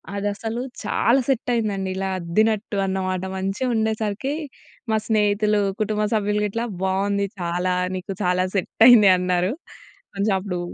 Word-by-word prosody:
అది 200 +1 -2
అసలు 225 +3 -4 0.2
చాలా 235 +5 +2
సెట్ 265 -3 0
అయిందండి. 205 -5 -1
ఇలా 195 0 -2
అద్దినట్టు 210 +4 0
అన్నమాట. 185 -1 -2 0.2
మంచిగుండేసరికి 220 +3 -1 0.6
మా 220 - +3
స్నేహితులు, 210 -1 +2 0.2
కుటుంబ 215 0 0
సభ్యులు 210 0 0
గిట్లా 230 +4 -2 0.2
బావుంది 200 +1 0 0.2
చాలా. 175 +1 -1 0.2
నీకు 185 +2 -5
చాలా 180 0 +2
సెట్టయింది 220 +2 +6
అన్నారు. 180 +1 0 0.6
కొంచెం 200 +1 +1
అప్పుడు 185 -2 -4
205 Hz, 125 wpm, -22 LUFS, 190-220 Hz, 0.6 s, సెట్టయింది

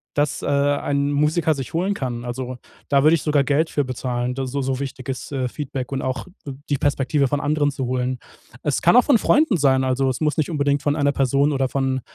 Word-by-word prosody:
dass, 145 -1 0
äh, - - -4
ein 140 0 +1
Musiker 150 +2 +2
sich 135 -4 -6
holen 185 +5 0
kann. 125 -8 -4
Also, 125 +1 -5 0.3
da 140 -1 +3
würde 155 +2 +6
ich 160 - -3
sogar 150 -2 +2
Geld 150 +4 +1
für 145 - 0
bezahlen, 125 -1 -3
da 135 0 -3
so 140 +2 -2
so 130 -1 -2
wichtig 135 -2 -6
ist 135 +2 -5 0.2
Feedback 135 -2 -5
und 135 -1 -2
auch 130 0 -3 0.2
d 140 - -5 0.2
die 145 - +1
Perspektive 140 0 +1
von 145 +2 -1
anderen 145 0 +1
zu 135 -2 -4
holen. 125 0 -1 0.5
Es 145 - 0
kann 175 - +5
auch 250 - +7
von 270 -6 +4
Freunden 295 -3 +3
sein, 135 -3 +3
also 130 +1 +1
es 130 - -3
muss 150 -1 +1
nicht 155 - 0
unbedingt 145 -3 0
von 145 0 +1
einer 145 -2 +2
Person 140 +2 +2
oder 135 -1 0
von 130 -1 -1
140 Hz, 225 wpm, -22 LUFS, 130-150 Hz, 0.5 s, auch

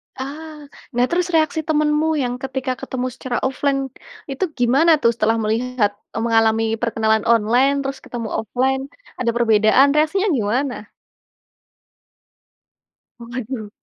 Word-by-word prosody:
Ah, 300 +3 -8 0.3
nah, 245 +1 +3
terus 345 0 0
reaksi 315 0 +2
temenmu 300 0 +2 0.2
yang 245 - -2
ketika 265 -1 -2
ketemu 255 -1 -3
secara 245 0 -4
offline, 275 +1 0 0.5
itu 270 - -3 0.2
gimana 270 +8 +4
tuh 235 - +4
setelah 225 0 +1
melihat 225 0 0 0.2
mengalami 225 -1 +2 0.2
perkenalan 220 -2 +1
online 235 +4 +3
terus 270 0 -4
ketemu 230 -3 -6
offline, 260 +4 0 0.4
ada 235 -2 +1
perbedaan 225 +3 +4
reaksinya 315 +7 +2
gimana? 245 0 -1 2.3
Waduh. 235 -2 -6
250 Hz, 115 wpm, -20 LUFS, 225-280 Hz, 2.3 s, gimana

